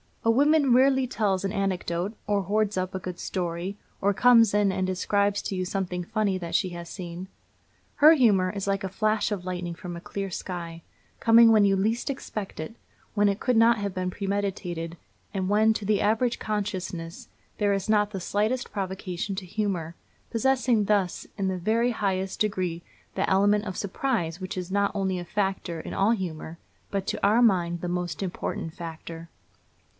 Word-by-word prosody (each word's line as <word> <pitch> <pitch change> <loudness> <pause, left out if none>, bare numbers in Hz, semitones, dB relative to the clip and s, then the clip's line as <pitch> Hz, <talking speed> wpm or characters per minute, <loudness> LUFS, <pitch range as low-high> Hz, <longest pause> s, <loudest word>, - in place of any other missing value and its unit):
A 230 - +4
woman 285 +1 +4
rarely 265 +1 +4
tells 200 -6 0
an 195 - -1
anecdote, 190 0 -2
or 205 -1 +1
hoards 210 +1 0
up 185 0 -2
a - - -2
good 180 -1 -6
story, 180 +2 -3 0.2
or 200 +1 +3
comes 230 -1 +6
in 205 -1 +3
and 190 0 -1
describes 200 +2 +1
to 195 - -3
you 185 - -1
something 180 -1 -2
funny 200 0 0
that 170 -2 -6
she 185 - +2
has 170 -1 -8
seen. 175 -1 -7 0.7
Her 305 +2 +8
humor 205 - +4
is 200 -1 -4
like 195 0 0
a 190 - -2
flash 215 +3 0
of 190 -3 -3
lightning 180 -1 -3
from 175 -1 -7
a 170 - -8
clear 195 +2 -4
sky, 170 -2 -6 0.4
coming 230 0 +7
when 215 -2 +6
you 195 -1 +3
least 220 +7 0
expect 215 - -5
it, 155 +8 -6 0.4
when 205 -1 +3
it 200 +1 -1
could 250 -3 +1
not 230 +1 +6
have 200 -2 -3
been 185 -1 -2
premeditated, 185 -4 -3 0.4
and 190 -2 -1
when, 215 +2 +4
to 215 - -4
the 210 0 +2
average 230 +3 +1
consciousness, 185 -5 -4 0.3
there 205 -1 +2
is 195 +1 -2
not 210 -1 +3
the 195 - -4
slightest 215 +7 -1
provocation 190 -1 -4
to 190 -1 -5
humor, 180 -4 -2 0.4
possessing 245 -2 +2
thus 195 -3 0
in 195 -2 0
the 190 -1 -1
very 225 +6 +1
highest 190 -4 -2
degree 185 -5 -1 0.3
that - - 0
element 205 +2 +3
of 185 -3 -5
surprise 190 -5 -2
which 185 0 -5
is 180 0 -4
not 200 0 +2
only 190 -2 0
a 175 - -6
factor 190 -4 -2
in - - -7
all 200 +3 +3
humor, 170 -6 -3 0.3
but 195 -1 -2
to - - -3
our 215 +4 +4
mind 175 -7 +2
the 175 - -3
most 175 -1 -3
important 175 -3 -4
factor. 165 0 -8
195 Hz, 185 wpm, -26 LUFS, 180-215 Hz, 0.7 s, Her